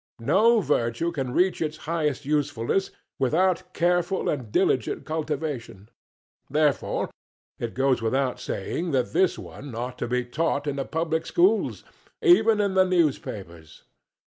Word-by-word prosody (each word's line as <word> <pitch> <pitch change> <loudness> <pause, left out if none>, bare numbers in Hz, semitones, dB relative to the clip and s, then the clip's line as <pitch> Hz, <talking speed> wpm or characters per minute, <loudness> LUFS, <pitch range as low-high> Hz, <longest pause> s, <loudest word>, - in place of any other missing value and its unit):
No 215 - +4
virtue 145 - 0
can 135 -6 -3
reach 180 +7 +2
its 155 -1 -2
highest 150 -4 -1
usefulness 145 +3 0 0.3
without 180 +6 +1
careful 175 +2 +1
and 125 -8 -3
diligent - - +1
cultivation 150 -9 -4 0.6
therefore, 150 -3 0 0.5
it 115 - -4
goes 130 -1 +2
without 130 +3 0
saying 165 - -3
that 125 -2 0
this 185 +2 +3
one 135 -4 -9
ought 125 +2 -5
to - - -2
be 125 +1 0
taught 145 +2 -1
in 145 -1 -2
the 135 - -2
public 160 0 -2
schools 195 +5 +2 0.4
even 225 - +5
in 200 -2 +1
the 190 0 +5
newspapers. 100 - -2
150 Hz, 135 wpm, -25 LUFS, 125-175 Hz, 0.6 s, even